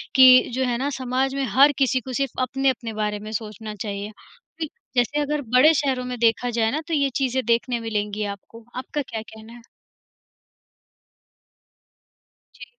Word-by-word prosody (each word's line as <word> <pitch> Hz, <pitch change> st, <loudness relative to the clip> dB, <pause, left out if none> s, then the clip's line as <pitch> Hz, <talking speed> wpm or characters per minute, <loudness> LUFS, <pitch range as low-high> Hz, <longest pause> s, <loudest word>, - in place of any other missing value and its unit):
कि 255 Hz, -1 st, +8 dB
जो 260 Hz, +2 st, 0 dB
है 245 Hz, -1 st, 0 dB
ना 270 Hz, +3 st, -1 dB
समाज 260 Hz, +1 st, -1 dB
में 275 Hz, -, -1 dB
हर 275 Hz, +8 st, +6 dB
किसी 265 Hz, -1 st, +2 dB
को 260 Hz, +1 st, -7 dB
सिर्फ़ 270 Hz, -1 st, -2 dB
अपने-अपने 255 Hz, -3 st, -1 dB
बारे 210 Hz, 0 st, -2 dB
में 215 Hz, +1 st, -8 dB
सोचना 215 Hz, 0 st, -6 dB
चाहिए। 205 Hz, 0 st, -5 dB, 0.8 s
जैसे 250 Hz, +4 st, +1 dB
अगर 295 Hz, 0 st, -1 dB
बड़े 300 Hz, +6 st, +7 dB
शहरों 265 Hz, -4 st, 0 dB
में 250 Hz, 0 st, -4 dB
देखा 235 Hz, +1 st, +2 dB
जाए 225 Hz, -1 st, +1 dB
ना, 305 Hz, +4 st, -2 dB
तो 335 Hz, -, -3 dB
ये 280 Hz, -2 st, +2 dB
चीज़ें 260 Hz, -1 st, 0 dB
देखने 235 Hz, +1 st, +1 dB
मिलेंगी 210 Hz, -2 st, -3 dB
आपको, 205 Hz, +3 st, -9 dB
आपका 260 Hz, +4 st, -3 dB
क्या 225 Hz, -5 st, -6 dB
कहना 220 Hz, +1 st, -13 dB
है? 240 Hz, -, -13 dB, 2.9 s
जी। -, -, -11 dB
245 Hz, 160 wpm, -23 LUFS, 220-270 Hz, 2.9 s, कि